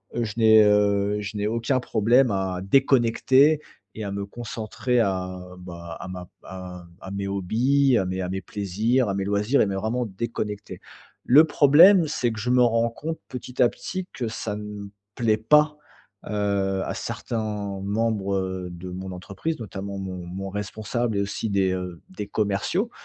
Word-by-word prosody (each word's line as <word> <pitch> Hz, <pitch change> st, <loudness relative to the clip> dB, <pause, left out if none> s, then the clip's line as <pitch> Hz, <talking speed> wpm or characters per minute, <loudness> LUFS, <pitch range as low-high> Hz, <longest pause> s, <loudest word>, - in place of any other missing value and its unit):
heu, 120 Hz, -, 0 dB
je 110 Hz, -2 st, -4 dB
n'ai, 110 Hz, -1 st, +7 dB
heu, 105 Hz, 0 st, +3 dB
je 105 Hz, +1 st, -5 dB
n'ai 105 Hz, 0 st, 0 dB
aucun 115 Hz, +4 st, 0 dB
problème 120 Hz, +2 st, +3 dB
à 95 Hz, -2 st, -2 dB
déconnecter 135 Hz, +5 st, +4 dB, 0.3 s
et 110 Hz, -, -5 dB
à 100 Hz, -, -4 dB
me 100 Hz, 0 st, -3 dB
concentrer 120 Hz, +2 st, -3 dB
à, 95 Hz, -3 st, -1 dB, 0.2 s
bah, 85 Hz, -2 st, -8 dB
à -, -, -7 dB
ma 90 Hz, -1 st, -7 dB
p -, -, -30 dB
à 90 Hz, -1 st, -8 dB
m 85 Hz, -, -21 dB
à 95 Hz, -, -8 dB
mes 100 Hz, 0 st, -3 dB
hobbies, 120 Hz, +8 st, +2 dB
à 95 Hz, -, +1 dB
mes 95 Hz, +1 st, -3 dB
à 90 Hz, -, -3 dB
mes 95 Hz, +1 st, -3 dB
plaisirs, 105 Hz, +6 st, 0 dB
à -, -, 0 dB
mes 95 Hz, 0 st, -1 dB
loisirs 105 Hz, +7 st, +2 dB
et -, -, +4 dB
mais 100 Hz, -, -2 dB
vraiment 110 Hz, +5 st, -1 dB
déconnecter. 105 Hz, -1 st, -5 dB, 0.5 s
Le 145 Hz, +6 st, +7 dB
problème, 160 Hz, +5 st, +6 dB
c'est 125 Hz, -5 st, 0 dB
que 110 Hz, -, -6 dB
je 120 Hz, +4 st, -2 dB
me 125 Hz, 0 st, +4 dB
rends 115 Hz, 0 st, +2 dB
compte, 160 Hz, +7 st, -5 dB
petit 125 Hz, 0 st, -5 dB
à 120 Hz, -, +6 dB
petit, 185 Hz, -1 st, -6 dB
que 120 Hz, -, -3 dB
ça 110 Hz, -1 st, -4 dB
ne 105 Hz, -1 st, -7 dB, 0.3 s
plaît 110 Hz, -3 st, +2 dB
pas, 150 Hz, +7 st, +4 dB, 0.5 s
heu, 100 Hz, -2 st, 0 dB
à -, -, -3 dB
certains 105 Hz, -3 st, -4 dB
membres, 105 Hz, -1 st, 0 dB
heu, 95 Hz, -1 st, -3 dB
de 85 Hz, +1 st, -8 dB
mon 95 Hz, +1 st, -6 dB
entreprise, 100 Hz, -, -5 dB
notamment 100 Hz, -2 st, -6 dB
mon 95 Hz, -2 st, -6 dB
mon 95 Hz, +2 st, -5 dB
responsable 110 Hz, +3 st, -3 dB
et -, -, +2 dB
aussi 100 Hz, +2 st, -3 dB
des, 95 Hz, -2 st, +2 dB
heu, 90 Hz, -2 st, -5 dB
des 100 Hz, +2 st, -6 dB
commerciaux, 105 Hz, -, -1 dB
105 Hz, 180 wpm, -24 LUFS, 95-120 Hz, 0.5 s, n'ai